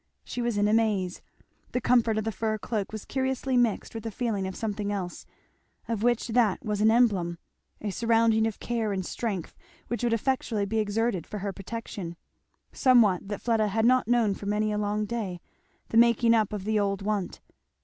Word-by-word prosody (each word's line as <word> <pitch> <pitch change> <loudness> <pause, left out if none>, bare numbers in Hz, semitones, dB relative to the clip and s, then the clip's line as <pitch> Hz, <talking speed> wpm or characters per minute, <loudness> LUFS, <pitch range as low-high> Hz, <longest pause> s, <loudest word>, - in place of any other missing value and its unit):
She 245 - -5
was 235 -3 -1
in 205 0 +3
a 210 - +2
maze. 205 -5 +1 0.5
The 250 - +1
comfort 230 -2 +3
of 215 - 0
the 225 - -1
fur 215 +1 -1
cloak 210 -1 -3
was 215 -1 -7
curiously 265 0 -1
mixed 240 -3 +1
with 225 -1 -6
the 225 - -3
feeling 210 -3 -2
of 190 - -6
something 210 -2 -3
else, 185 -3 -5 0.6
of 230 -3 -2
which 240 +1 +1
that 225 -4 +2
was 210 -1 -1
an 220 - +5
emblem, 200 -8 +2 0.4
a 210 - -3
surrounding 225 0 +3
of 220 - -5
care 225 -3 -1
and 190 -2 -2
strength 200 -7 -4 0.3
which 240 0 -2
would 240 - +2
effectually 230 -3 0
be 220 +2 -1
exerted 210 -3 0
for 210 - -5
her 200 0 -3
protection, 195 -3 -6 0.6
somewhat 225 - +4
that 205 -1 -5
Fleda 225 -3 +2
had 220 +2 +1
not 255 0 +4
known 235 -4 +3
for 200 - -7
many 210 +1 +1
a 210 - -1
long 210 +1 -1
day, 205 -6 -4 0.5
the 225 - +1
making 235 0 +5
up 220 -3 +2
of 205 -3 -4
the 215 +1 +1
old 200 -1 -1
want. 205 -3 -2
215 Hz, 195 wpm, -27 LUFS, 200-230 Hz, 0.6 s, an